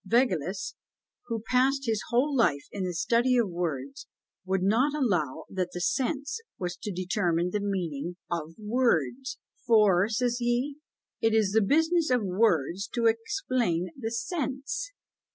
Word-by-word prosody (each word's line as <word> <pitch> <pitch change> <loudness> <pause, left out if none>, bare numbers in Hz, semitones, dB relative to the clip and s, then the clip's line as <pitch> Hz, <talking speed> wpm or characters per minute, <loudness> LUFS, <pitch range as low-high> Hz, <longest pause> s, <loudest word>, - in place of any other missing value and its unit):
Vaugelas, 195 - +1 0.5
who 225 -2 -3
passed 270 +2 +2
his 220 -2 0
whole 265 +4 +2
life 160 - +2
in 200 - -3
the 180 - -2
study 240 +8 +2
of 235 -3 +3
words, 140 -6 -4 0.4
would 190 0 0
not 245 +9 +3
allow 180 - 0
that 185 -2 -2
the 175 - -4
sense 280 - -1 0.2
was 180 -1 -3
to 210 - -5
determine 180 -2 0
the 210 - 0
meaning 180 -5 -3 0.2
of 165 -1 -3
words; 235 - 0 0.3
for, 210 -4 +5
says 240 +2 0
he, 245 +4 0 0.4
it 225 0 +3
is 215 -3 +3
the 220 +2 +4
business 320 - +3
of 250 -3 +2
words 185 -2 +1
to 235 -1 -2
explain 225 - 0
the 225 -4 -4
sense. 275 - -3
220 Hz, 145 wpm, -28 LUFS, 180-250 Hz, 0.5 s, for